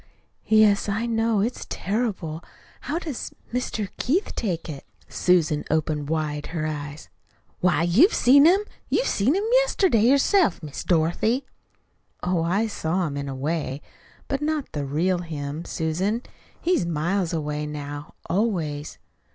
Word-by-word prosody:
"Yes, 215 -2 +4
I 210 +4 0
know. 225 -2 +1
It's 235 +4 -2
terrible. 195 -7 -2 0.5
How 305 - 0
does 315 -7 -4 0.2
Mr. 220 -5 -2
Keith 335 - 0
take 180 -7 -2
it?" 145 -4 -7 0.2
Susan 160 -5 +2
opened 150 -2 0
wide 150 -2 -2
her 160 -2 -3
eyes. 150 -1 -5 0.5
"Why, 180 -2 +2
you've 225 - +5
seen 280 +4 +6
him 370 +5 +6 0.3
you - - +2
see 200 - 0
him 275 +7 +4 0.3
yesterday 380 - +2
yourself, 270 - +3
Miss 145 -2 -6
Dorothy." 180 - +1 0.8
"Oh, 180 -1 +1
I 185 +7 +1
saw 180 -4 -1
him 145 -3 -3
in 140 -1 -4
a 135 - -4
way, 145 0 -2 0.5
but 275 +1 -2
not 300 -2 -1
the 145 -2 -3
real 170 +6 +1
him, 155 -1 -5
Susan. 185 +9 -1 0.4
He's 350 - +1
miles 170 +3 0
away 150 -2 -2
now, 145 0 -7
always." 165 -7 -1
175 Hz, 140 wpm, -24 LUFS, 155-230 Hz, 0.8 s, seen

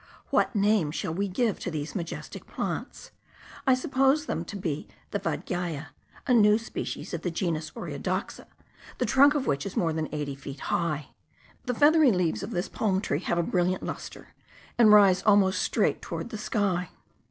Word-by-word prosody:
What - - +2
name 205 -5 +3
shall 160 +2 -3
we 200 +4 -1
give 215 +2 0
to - - -4
these 155 -2 -4
majestic 170 -5 -6
plants? - - -5 0.6
I 260 - +6
suppose 270 +2 +2
them 165 - -2
to 205 - -8
be 165 -6 -3 0.2
the - - -1
vadgiai, 165 -4 -3 0.4
a 250 - +2
new 210 -2 +6
species 230 -4 -6
of 170 - -3
the 175 - -1
genus 165 -3 -2
Oreodoxa, - - -4 0.5
the - - 0
trunk 280 +2 +5
of 280 -3 0
which 140 0 0
is 195 - -6
more 165 -2 +1
than 155 -1 -2
eighty 145 -2 -3
feet 135 0 -9
high. 150 -4 -1 0.6
The 250 -2 -1
feathery 295 0 +6
leaves 175 - 0
of - - -5
this 175 +2 -2
palm 195 -4 0
tree 150 -7 -1
have 175 - -1
a 170 - +2
brilliant 180 +1 0
lustre, - - -7 0.5
and 225 -3 +6
rise 200 -3 +7
almost 200 -2 +4
straight - - +1
toward - - -5
the 215 - -4
sky. 195 -5 -1
185 Hz, 175 wpm, -27 LUFS, 165-220 Hz, 0.6 s, rise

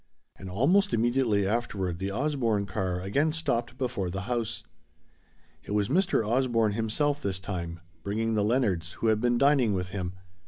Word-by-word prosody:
And 95 - -9
almost 175 - +3
immediately 115 -4 +2
afterward 100 -6 -1
the 95 +1 -2
Osborne 115 -4 0
car 95 -3 -2
again 140 +11 +1
stopped 130 -6 -2
before 125 -8 -2
the 95 +2 -4
house. 115 0 -2 1.0
It - - -5
was 105 -1 +1
Mr. 175 - +2
Osborne 115 -2 +2
himself 115 +7 0
this 95 -2 -2
time, 85 -3 -5 0.2
bringing 110 +4 -1
the 105 -1 +2
Leonards, 100 -8 +1
who 115 - -2
had 110 -1 +2
been 120 0 +2
dining 140 -5 +4
with 90 -1 -2
him. 90 -2 -4
110 Hz, 160 wpm, -28 LUFS, 95-130 Hz, 1.0 s, dining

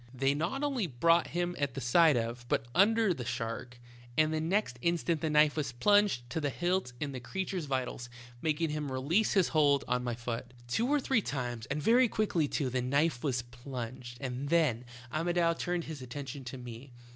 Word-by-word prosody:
They 135 +2 +2
not 170 - -2
only 265 -9 0
brought 165 +6 +3
him 175 0 -2
at 140 -3 -1
the - - -3
side 145 +4 +5
of, 120 +1 -3
but - - +1
under 215 - +4
the 130 - -6
shark, 115 +2 -4 0.4
and 155 0 +3
the 155 - 0
next 165 -7 0
instant 170 -1 0
the 160 - 0
knife 150 -1 +4
was 140 -5 -2
plunged 205 -4 +3
to 160 - -2
the 145 - 0
hilt 175 0 -1
in 145 -2 -3
the 130 - -5
ereature's 185 +4 -3
vitals, 130 -2 -3 0.3
making 160 0 0
him 150 -2 -3
release 155 +12 +1
his 190 -4 +3
hold 145 -3 +3
on 125 0 0
my 120 -1 -2
foot. 120 +1 -5
"Two 225 - 0
or 295 0 +3
three 260 -3 +1
times, 120 - -4
and 145 +2 -3
very 245 +5 +5
quickly 200 -9 0
too, 135 -3 -1
the 130 0 0
knife 140 +1 +1
was 130 -5 0
plunged, 120 0 -7
and 130 +1 -4
then 150 -8 +2 0.3
Amodou 170 +1 +2
turned 175 -1 -1
his 155 -4 -7
attention 135 +1 -7
to 120 +2 -6
me. 120 +1 -10
145 Hz, 195 wpm, -31 LUFS, 125-170 Hz, 0.4 s, side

